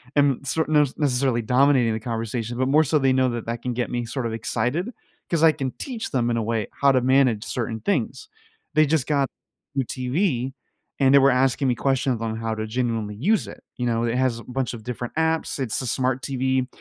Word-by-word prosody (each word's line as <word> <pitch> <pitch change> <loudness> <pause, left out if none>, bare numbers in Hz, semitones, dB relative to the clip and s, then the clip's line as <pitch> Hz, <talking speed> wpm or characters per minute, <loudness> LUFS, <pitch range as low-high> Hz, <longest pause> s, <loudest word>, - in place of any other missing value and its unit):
am 140 -2 +2
sort 160 +3 0
nos 150 -3 +3
necessarily 130 -4 +1
dominating 125 -1 +3
the 110 - -2
conversation, 115 0 -3
but 130 +1 +1
more 150 +3 +5
so 150 +1 +2
they 135 -1 +3
know 130 0 +3
that 120 -2 -4
that 115 0 -3
can 125 - -2
get 120 0 -2
me 120 -1 -2
sort 125 +2 -4
of 110 - -4
excited, 125 - -2 0.4
'cause 165 -3 +1
I 160 - +8
can 135 -4 -3
teach 245 -5 -5
them 120 -3 +1
in 115 - 0
a 115 - 0
way 110 -2 -1
how 140 - +6
to 130 -1 +3
manage 130 -4 +3
certain 115 -2 -3
things. 225 - -1 0.5
They 155 - +6
just 155 -4 +1
got 140 -3 +2 0.5
new 135 -2 0
TV, 130 - -1 0.5
and 135 0 +4
they 140 - +8
were 135 0 +5
asking 130 +1 +2
me 125 - +1
questions 135 0 +1
of 115 - -8
'em 110 - -4
how 115 0 -2
to 110 0 -3
genuinely 115 -2 -2
use 195 - +1
it, - - -11
you 125 - -2
know, 115 -1 0
it 115 +1 0
has 130 -3 +1
a - - -10
bunch 125 -1 -3
of 115 -2 -8
different 120 +1 -5
apps- 160 -2 0
it's 125 -5 -1
a - - -4
smart 130 +1 0
TV- 130 -1 0
130 Hz, 230 wpm, -23 LUFS, 120-140 Hz, 0.5 s, I